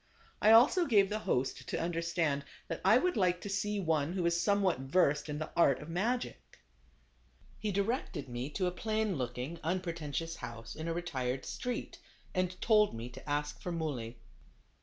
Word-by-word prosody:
I 215 - +5
also 280 +10 +6
gave 200 -6 +5
the 215 +1 -1
host 130 +1 0
to - - -1
understand 165 -4 0 0.3
that - - -3
I - - +6
would 360 -3 +1
like 180 -4 +2
to 205 - -5
see 205 +1 -1
one 160 -3 +1
who 185 -2 -1
was 170 0 +2
somewhat 200 -7 +2
versed 150 +1 +2
in 150 - -2
the 155 0 -5
art 140 -6 +4
of 150 - -9
magic. 190 - -2 1.0
He 210 -1 -1
directed 200 - -1
me 120 +2 -4
to 190 - 0
a 180 - +1
plain 215 +1 -1
looking, 125 +6 -4
un 180 +4 0
pretentious 165 -2 -4
house, 115 -1 -7
in 160 +1 -5
a 165 - 0
retired 130 -7 -2
street, 250 0 -4 0.3
and 185 -1 -1
told 210 - +4
me 115 +2 -6
to 135 +3 -11
ask 145 0 -2
for 180 - -4
Muley. 135 -9 -3
170 Hz, 180 wpm, -32 LUFS, 145-200 Hz, 1.0 s, also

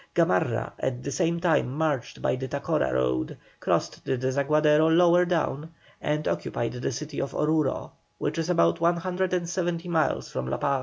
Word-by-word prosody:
Gamarra - - +1
at 125 -1 -2
the 140 - -3
same 170 +1 0
time 165 -7 +2
marched 150 -6 -1
by - - +2
the 130 +1 -4
Tacora 140 - 0
road, 65 0 0 0.2
crossed - - -1
the 130 - -1
Desaguadero 150 +4 +3
lower 175 +2 +5
down, 160 -2 -1 0.3
and 150 +1 -1
occupied 120 - -2
the 125 +1 -3
city 145 +3 -4
of 135 - -4
Oruro, 150 -2 0 0.3
which 165 - -2
is 165 +1 -2
about 85 - +3
170 175 0 0
miles 160 -2 +1
from 65 0 -3
La 65 - -1
Paz. 140 -1 +1
150 Hz, 160 wpm, -26 LUFS, 130-170 Hz, 0.3 s, lower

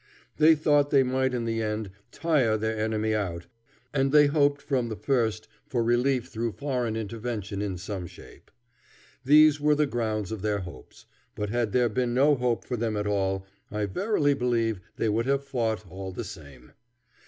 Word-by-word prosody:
They 160 +1 +6
thought 145 -1 +3
they 140 -2 +5
might 130 +1 0
in 120 -2 -2
the 115 0 -1
end 105 -2 -3 0.2
tire 135 -10 +1
their 110 +1 -2
enemy 110 0 -1
out, 90 -5 -2 0.5
and 135 -1 +1
they 150 0 +7
hoped 145 -1 +2
from 130 -5 -1
the 110 - -4
first 110 -4 0 0.2
for 125 -5 0
relief 120 +2 +1
through 115 -2 -3
foreign 125 -5 -2
intervention 110 -2 -4
in 100 -3 -3
some 95 -1 -5
shape. - - -15 0.7
These 150 +1 +6
were 150 0 +4
the 150 0 +2
grounds 110 -6 -2
of 110 -3 -4
their 105 -1 -1
hopes; 85 -7 -12 0.3
but 105 -1 -3
had 120 -3 0
there 125 +1 +3
been 120 +2 -1
no 145 +3 +5
hope 125 -3 -1
for 125 - -3
them 110 -2 -1
at 105 - -2
all, 95 -2 -1 0.2
I 105 0 -2
verily 150 - +1
believe 115 -5 0 0.2
they - - -1
would 115 +3 0
have 140 0 +1
fought 115 -6 -2
all 95 +2 -7
the 105 +6 -5
same. 70 - -12
115 Hz, 180 wpm, -27 LUFS, 105-135 Hz, 0.7 s, they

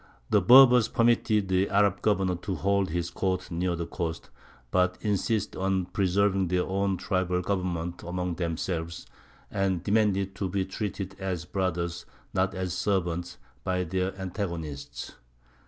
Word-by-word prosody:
The - - +5
Berbers 125 -2 +8
permitted 115 -3 +2
the 95 +1 +2
Arab 100 -1 +2
governor 95 -3 +2
to 95 +2 -4
hold 100 0 +1
his 85 +1 -2
court 95 -1 -2
near 85 +1 0
the 85 0 -3
coast, 80 -1 -5 0.4
but 90 0 +2
insisted 105 0 0
on 95 -1 +1
preserving 95 0 +1
their 90 +1 +1
own 95 0 0
tribal 90 -1 0
government 90 -3 -2
among 90 0 -3
themselves, 85 0 -3 0.5
and 95 -3 0
demanded 100 -2 +2
to 95 - -2
be 95 +1 -1
treated 95 0 -4
as 95 -3 -3
brothers, 85 -2 -2 0.3
not 95 +1 +1
as 95 -1 -2
servants, 90 -3 -1 0.3
by 90 0 0
their 95 +3 -2
antagonists. 85 -6 -5
95 Hz, 140 wpm, -28 LUFS, 90-100 Hz, 0.5 s, Berbers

